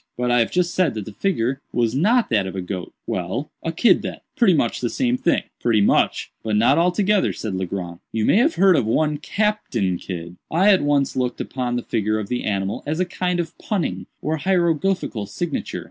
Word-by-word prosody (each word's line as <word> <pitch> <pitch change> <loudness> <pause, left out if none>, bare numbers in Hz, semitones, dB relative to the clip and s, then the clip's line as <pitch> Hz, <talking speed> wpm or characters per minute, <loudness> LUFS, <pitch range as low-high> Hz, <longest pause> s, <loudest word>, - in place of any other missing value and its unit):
"But 125 0 0
I 120 - +4
have 115 - +2
just 175 -1 0
said 175 -10 +1
that 105 -2 -4
the 110 - -8
figure 135 - -1
was 120 -2 +1
not 215 - +2
that 100 -4 +2
of 95 - -6
a 95 - -2
goat." 90 -1 -5
"Well, 95 +11 -3
a 165 - -2
kid 200 +8 +4
then—pretty 205 -8 0
much 120 -6 0
the 120 - 0
same 250 - +1
thing." 260 +1 +1 0.2
"Pretty 115 -3 +2
much, 100 - +2
but 110 -1 -1
not 120 +8 +4
altogether," 190 +3 +2
said 110 -3 -5
Legrand. 90 -2 -4
"You 110 -1 0
may - - +4
have 290 +8 +3
heard 190 -1 +5
of 115 - +1
one 150 +5 +1
Captain 145 - -1
Kidd. 85 -1 -7
I 190 +6 +5
at 190 - +3
once 145 -1 +1
looked 125 -1 -1
upon 125 -2 -3
the 120 - -2
figure 110 -1 0
of 105 -2 -4
the 125 - -2
animal 100 -1 -1
as 155 +3 -1
a 185 - +2
kind 180 0 -2
of 170 -1 -3
punning 195 -7 -2 0.2
or 155 +2 0
hieroglyphical 170 - 0
signature. 175 - -3
135 Hz, 210 wpm, -22 LUFS, 110-180 Hz, 0.2 s, heard